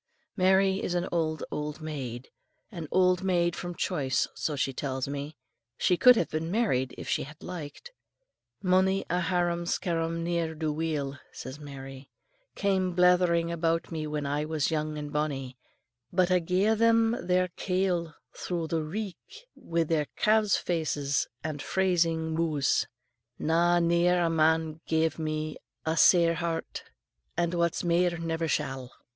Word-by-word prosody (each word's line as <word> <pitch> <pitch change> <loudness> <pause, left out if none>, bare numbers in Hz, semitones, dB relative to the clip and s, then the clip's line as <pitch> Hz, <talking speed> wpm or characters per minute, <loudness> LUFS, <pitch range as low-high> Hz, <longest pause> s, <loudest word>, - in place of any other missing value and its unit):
Mary 190 0 +3
is 180 - -2
an 175 +1 0
old, 155 -3 -1
old 150 +1 -4
maid, 130 -6 -6 0.4
an 170 -6 -6
old 185 -1 +3
maid 175 -2 +1
from 175 0 -5
choice 130 -6 0
so 150 - -2
she 135 -1 -1
tells 130 0 -3
me, 145 +2 -5 0.4
she 180 - +3
could 250 +7 +7
have 175 - +1
been 155 +1 -2
married 175 - 0
if - - -7
she - - 0
had 150 +2 -10
liked. 175 - -8 0.7
"Mony 190 +1 +3
a 180 - +2
harum 175 -1 0
scarum 165 -1 -1
ne'er 170 -2 -1
do 155 -1 -1
weel," 150 -3 -2
says 130 +3 -8
Mary, 135 -2 -9 0.5
"came 190 -2 +1
blethering 180 -2 +4
about 165 0 0
me 155 -2 -3
when 150 -1 -3
I 145 +1 -1
was 155 -1 -1
young 155 -1 -1
and 145 -1 -6
bonnie, 135 -4 -2 0.6
but 185 0 +2
I 180 - +5
ga'e 185 +5 +2
them 230 0 +4
a' 240 - -3
their 180 0 +1
kail 180 -3 -1 0.2
thro' 175 -2 -3
the 160 0 -1
reek, 195 - -7
wi' 170 0 -1
their 155 -2 0
calves' 215 -1 +3
faces 150 -5 -1 0.2
and 150 -2 -4
phrasing 165 -3 +1
mou's. 160 -4 +1 0.5
Na, 170 +2 +3
ne'er 170 +1 +3
a 165 - +1
man 160 0 +2
gave 160 0 +1
me 155 -1 -3 0.3
a 160 0 0
sair 170 0 +6
heart, 165 -1 -4 0.5
and 170 0 +1
what's 170 -1 0
mair 175 0 +2
never 165 0 -2
shall." 135 -4 -2
165 Hz, 150 wpm, -28 LUFS, 150-180 Hz, 0.7 s, could